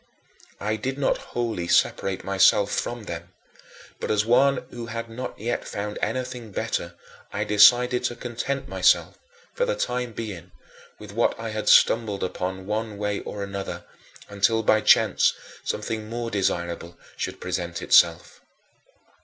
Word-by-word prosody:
I 110 +1 -1
did 130 +5 -3
not 140 - +1 0.2
wholly 110 -8 -1
separate 95 +2 +1
myself 100 +1 +4
from 120 -2 -3
them, 85 -1 -7 0.7
but - - -4
as 105 0 +2
one 135 +3 +3
who 120 -1 -7
had 115 0 -5
not 125 +3 -6
yet 120 +3 -3
found 105 +1 -4
anything 125 -3 -3
better - - -3 0.4
I 105 - -1
decided 120 +4 +5
to 120 - -1
content 125 +3 -4
myself, - - +2 0.3
for - - 0
the - - -1
time 125 - -2
being, 95 -6 -7 0.4
with 105 -2 -11
what 115 +2 +1
I 115 0 -4
had 110 0 -1
stumbled 110 -4 +4
upon 95 +1 -4
one 105 +1 -3
way 105 0 -2
or 100 - -6
another, 100 0 -5 0.4
until 105 +3 +1
by 110 0 +4
chance - - +4 0.3
something 110 0 -3
more 115 0 -4
desirable 85 -3 -2 0.2
should - - -4
present 85 -1 -4
itself. - - +3
110 Hz, 145 wpm, -25 LUFS, 100-120 Hz, 0.7 s, decided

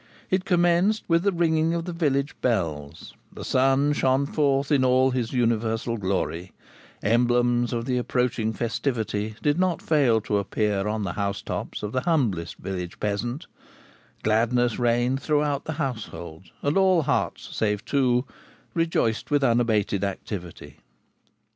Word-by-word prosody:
It 185 0 +1
commenced 175 +4 +2
with 165 -1 +3
the 200 +2 +2
ringing 165 -2 +1
of 165 -1 -3
the 175 - -4
village 145 -4 0
bells; 80 - -2 0.2
the - - -8
sun 135 +3 +3
shone 135 0 +2
forth 140 -1 +1
in 140 -3 +4
all 130 +1 +4
his 125 -3 -2
universal 115 -1 0
glory; 95 -3 -2 0.5
emblems 120 +2 +2
of 115 -1 -2
the 125 -1 0
approaching 125 -3 0
festivity 110 -2 -2
did 145 +3 +2
not 185 -2 +1
fail 135 -8 +3
to 105 -1 0
appear 100 0 -1
on 105 0 -1
the 90 -3 -3
housetops 100 +2 -4
of 105 - -3
the 130 - 0
humblest 115 - 0
village 90 -2 -6
peasant; 120 +7 -2 0.8
gladness 115 +2 +2
reigned 120 +2 +1
throughout 145 -1 0
the 160 - -3
household, 110 - -5 0.2
and 145 +5 +1
all 185 -4 +4
hearts, 145 - -2
save 105 -1 -1
two, 125 -2 +2 0.5
rejoiced 165 -9 0
with 145 -1 +2
unabated 115 -5 +2
activity. 95 -3 -6
120 Hz, 140 wpm, -25 LUFS, 105-145 Hz, 0.8 s, in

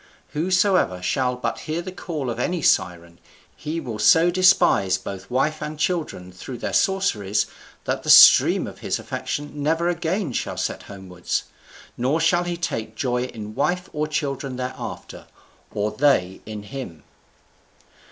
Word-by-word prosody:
Whosoever 185 - +1
shall 125 +5 0
but 120 -2 -3
hear 155 +1 -3
the 185 - -6
call 155 -9 -4
of 115 - -6
any 170 +5 -1
Siren, 85 -2 +1 0.4
he 160 +2 -4
will 115 -8 -6
so 165 +11 +5
despise 135 - +4
both 95 0 -8
wife 140 +5 0
and 150 0 -5
children 155 - -2
through 120 +7 -8
their - - -4
sorceries 110 - +1 0.4
that - - -1
the - - -6
stream - - +8
of - - -9
his - - -2
affection 145 0 -5
never 165 +4 +1
again 175 - -2
shall - - -3
set - - -2
homewards, 95 -3 -4 0.5
nor 130 +6 +1
shall 175 +2 +2
he 175 -1 -3
take 115 -10 -4
joy 125 0 -1
in 110 -4 -8
wife 180 - -1
or 150 0 -1
children 140 -3 -3
thereafter, 125 0 -7 0.4
or 105 +1 -1
they 110 -10 +1
in 105 -1 -6
him." 100 - -8
135 Hz, 150 wpm, -23 LUFS, 105-165 Hz, 0.5 s, stream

